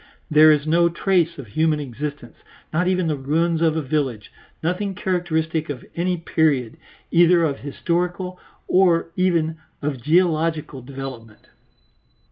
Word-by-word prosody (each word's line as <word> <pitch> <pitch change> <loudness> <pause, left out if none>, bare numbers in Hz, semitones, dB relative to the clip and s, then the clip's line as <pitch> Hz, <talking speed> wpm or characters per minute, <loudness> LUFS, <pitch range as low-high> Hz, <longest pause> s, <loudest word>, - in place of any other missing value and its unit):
There 155 +1 +7
is 150 -1 +2
no 170 +2 +3
trace 170 -1 +1
of 140 - -7
human 155 +7 +1
existence, 140 -1 -6 0.4
not 180 +3 +1
even 185 -1 +1
the 155 -2 0
ruins 160 +4 0
of 160 -1 +2
a 160 - -1
village; 130 -6 -2 0.3
nothing 185 +4 -1
characteristic 160 -4 -1
of 140 -4 -6
any 180 +1 0
period, 155 -6 0 0.3
either 170 0 +5
of 145 -4 -1
historical 175 +5 -2 0.3
or 175 -3 +3
even 165 -4 +1 0.2
of 140 -4 -3
geological 160 -2 +1
development. 130 -4 -9
160 Hz, 130 wpm, -22 LUFS, 145-175 Hz, 0.4 s, There